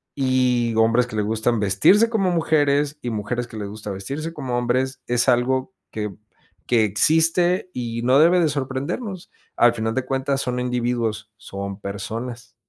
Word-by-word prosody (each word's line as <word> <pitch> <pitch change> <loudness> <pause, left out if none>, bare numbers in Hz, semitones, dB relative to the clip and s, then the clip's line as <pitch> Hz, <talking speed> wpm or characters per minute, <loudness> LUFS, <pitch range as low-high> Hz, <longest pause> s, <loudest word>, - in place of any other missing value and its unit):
y 125 -3 +1
hombres 115 +2 +3
que 110 - -8
le 105 - +1
gustan 110 +2 0
vestirse 105 - +4
como 205 -5 +1
mujeres, 150 -3 +1
y 120 - -3
mujeres 115 +2 -3
que 115 - -12
les 105 -2 -5
gusta 105 0 -8
vestirse 140 +12 -5
como 130 -6 -3
hombres, 130 +2 -1
es 120 0 +2
algo 130 +6 +1 0.2
que 105 -2 -4 0.5
que 115 -3 +3
existe 165 - +2
y 115 -2 -4
no 130 +3 +4
debe 175 +3 +5
de 160 - +2
sorprendernos". 145 - -4 0.2
Al 120 0 +5
final 115 -1 -2
de 130 - 0
cuentas 135 +1 -1
son 125 0 -2
individuos, 120 -3 -2
son 100 -1 -7
personas 115 +4 -6
125 Hz, 160 wpm, -22 LUFS, 110-140 Hz, 0.5 s, debe